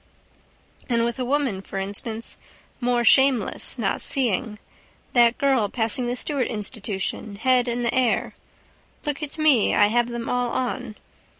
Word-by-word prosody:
And 235 -1 +2
with 235 +1 -3
a - - 0
woman, 260 -7 0
for 195 - -8
instance. 205 +4 -4 0.4
More 245 -1 +1
shameless 265 -2 +3
not 210 -5 -1
seeing. 230 -4 0 0.6
That 240 -1 +5
girl 265 -7 +2
passing 235 +2 -1
the 245 - -1
Stewart 275 0 -1
institution, 210 -2 -4
head 250 +3 +2
in 240 0 -1
the 235 - 0
air. 250 -3 +1 0.7
Look 295 0 -2
at 300 0 -6
me. 300 -8 +3
I 205 - +5
have 240 +2 +2
them 235 -1 -5
all 245 -1 0
on. 250 -2 -3
240 Hz, 145 wpm, -24 LUFS, 220-255 Hz, 0.7 s, That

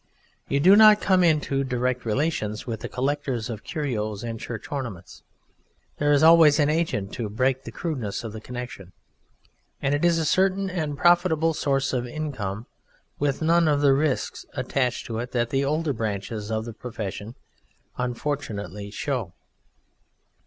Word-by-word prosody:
You 140 - +1
do 185 +7 +7
not 215 0 +8
come 185 -2 +3
into 150 -4 +2
direct 125 -1 -1
relation 110 -2 0
with 115 -3 -4
the - - -6
collectors 130 -3 -2
of 105 -2 -7
curios 110 -8 -3
and 115 -1 -5
church 115 -1 -7
ornaments: 120 -11 -6 0.8
there 145 0 +2
is 145 +1 +4
always 160 -2 +7
an 145 0 +3
agent 155 -12 -1
to 115 -4 -3
break 130 +5 0
the - - -7
crudeness 130 - -4
of 110 -2 -6
the 110 - -7
connexion. 120 -7 -8 0.9
And 140 0 0
it 145 - 0
is 170 -1 +4
a 160 - 0
certain 190 +3 +2
and 155 -5 -3
profitable 175 -2 +3
source 135 -3 0
of 125 -1 -1
income 120 -7 -4 0.5
with 145 +1 0
none 170 +1 +4
of 145 -1 +2
the 140 -2 +5
risks 140 -1 -1
attached 125 -3 -1
to 115 -1 -4
it 125 +2 -5
that 120 -1 0
the 135 0 +1
older 150 +1 0
branches 105 -1 -4
of 110 0 -2
the 115 - -7
profession 110 -1 -6 0.6
unfortunately 120 - -3
show. 115 - -3
135 Hz, 160 wpm, -25 LUFS, 115-155 Hz, 0.9 s, not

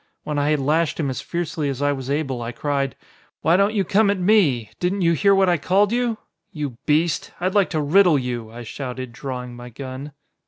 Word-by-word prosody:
When 150 -1 -2
I 145 +1 +1
had 150 -1 +2
lashed 155 +4 +1
him 140 -4 0
as 130 - -4
fiercely 165 -3 -3
as 135 -2 -4
I 145 0 +2
was 135 -2 -4
able 140 -4 -1
I 115 0 -4
cried: 135 +1 -2 0.5
"Why 165 - +4
don't 200 +3 +2
you 200 - +2
come 200 +3 +3
at 200 - +1
me? 175 - +3
Didn't 185 +2 0
you 170 0 +4
hear 200 +4 +4
what 195 -1 +4
I 175 -1 +3
called 195 +7 +2
you? 240 -2 0 0.3
You 145 -6 -5
beast! 155 +2 +1
I'd 185 +1 0
like 200 -2 +3
to 155 - -1
riddle 170 +2 +5
you!" 120 -4 -3
I 120 +2 -9
shouted, 130 +1 -6
drawing 125 -1 -6
my 120 0 -9
gun. 135 +3 -8
150 Hz, 220 wpm, -22 LUFS, 130-180 Hz, 0.5 s, riddle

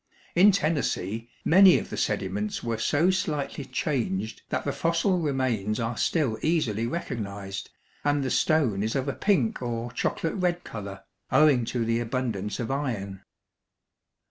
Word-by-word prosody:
In 195 +4 +7
Tennessee, 120 - -1 0.2
many 190 +2 +7
of - - -5
the - - -3
sediments 100 +2 -2
were 115 -2 -2
so 155 +10 +3
slightly 150 -6 -2
changed 110 -7 -2
that - - -2
the - - 0
fossil 170 +3 +1
remains 130 - 0
are 115 0 -2
still 130 -9 0
easily 120 -9 +1
recognized, 100 - -5 0.3
and 145 -1 +1
the 130 - -2
stone 135 -11 +2
is 110 +4 -1
of 135 0 -1
a 140 - 0
pink 210 - +1
or 120 -1 -3
chocolate 160 +6 -1
red 180 -3 0
color, 100 -3 -7 0.3
owing 145 -6 +5
to 120 0 -1
the 115 +1 +1
abundance 115 -4 -2
of 120 +1 -2
iron. 105 -9 -3
125 Hz, 145 wpm, -27 LUFS, 110-155 Hz, 0.3 s, In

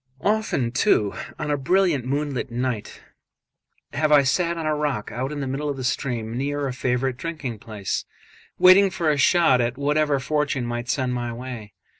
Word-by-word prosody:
Often, 210 - 0
too, 105 -4 +2 0.2
on 150 -1 -3
a 145 - +1
brilliant 160 -2 +2
moonlight 140 -1 -2
night 120 -2 -4 0.9
have 155 0 +1
I 145 -2 +7
sat 170 +5 +1
on 165 - -4
a 155 - +1
rock 145 -8 -2
out 130 +5 -3
in 145 -1 -4
the 135 - -3
middle 140 +3 -2
of 140 - -3
the 130 - -5
stream, 120 -3 -2
near 145 +2 -2
a 130 - -3
favourite 125 0 -1
drinking 140 -8 -5
place, 105 -3 -4 0.5
waiting 190 +2 +7
for 175 -4 0
a 145 - 0
shot 140 -3 +4
at 120 +1 -1
whatever 145 0 +1
fortune 145 -2 -1
might 120 0 -4
send 125 0 0
my 120 -1 -3
way. 115 -3 -8
135 Hz, 180 wpm, -23 LUFS, 125-150 Hz, 0.9 s, I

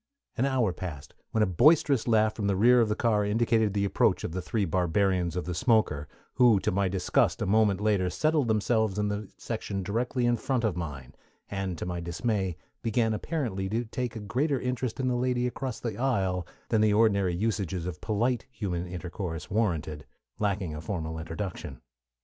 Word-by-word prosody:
An 130 - +1
hour 125 -8 +1
passed, 80 -7 -7 0.2
when 110 - +2
a - - +4
boisterous 135 - +4
laugh 110 -2 +3
from 105 -2 -2
the 100 - +2
rear 120 +5 +5
of 110 - +2
the 105 - +1
car 110 -2 +2
indicated 110 0 +1
the 100 -1 +2
approach 100 - +2
of - - -3
the 90 +2 -3
three 105 +3 -1
barbarians 90 0 +1
of 90 - -2
the 90 - -3
smoker, 90 - +2 0.3
who 120 -5 +5
to - - 0
my 100 +1 +1
disgust 95 -1 +1
a - - -1
moment 105 -1 +3
later 105 -4 +1
settled 150 - +1
themselves 110 -1 +1
in 105 0 0
the 105 0 -4
section 100 -1 -4
directly 120 +5 -1
in 120 0 +3
front 125 +1 -1
of 105 -6 +1
mine, 75 -7 -6 0.4
and 95 -3 -3
to - - -4
my 90 -1 -3
dismay 90 +1 -2 0.2
began 115 0 +1
apparently 110 - -2
to 115 +4 -1
take 120 +2 -4
a - - -4
greater 130 +7 0
interest 125 -1 -3
in 130 - 0
the 125 - +1
lady 125 0 0
across 125 0 -3
the 115 -4 -4
aisle 95 -9 0 0.2
than 110 - +3
the 105 -1 +4
ordinary 100 -5 +3
usages 95 -3 -1
of 90 - -5
polite 115 +3 0
human 90 -8 -3
intercourse 90 -1 -5
warranted, 80 -8 -1 0.3
lacking 100 -5 -1
a 75 - -6
formal 80 -2 -4
introduction. 80 -5 -6
105 Hz, 190 wpm, -28 LUFS, 90-115 Hz, 0.4 s, rear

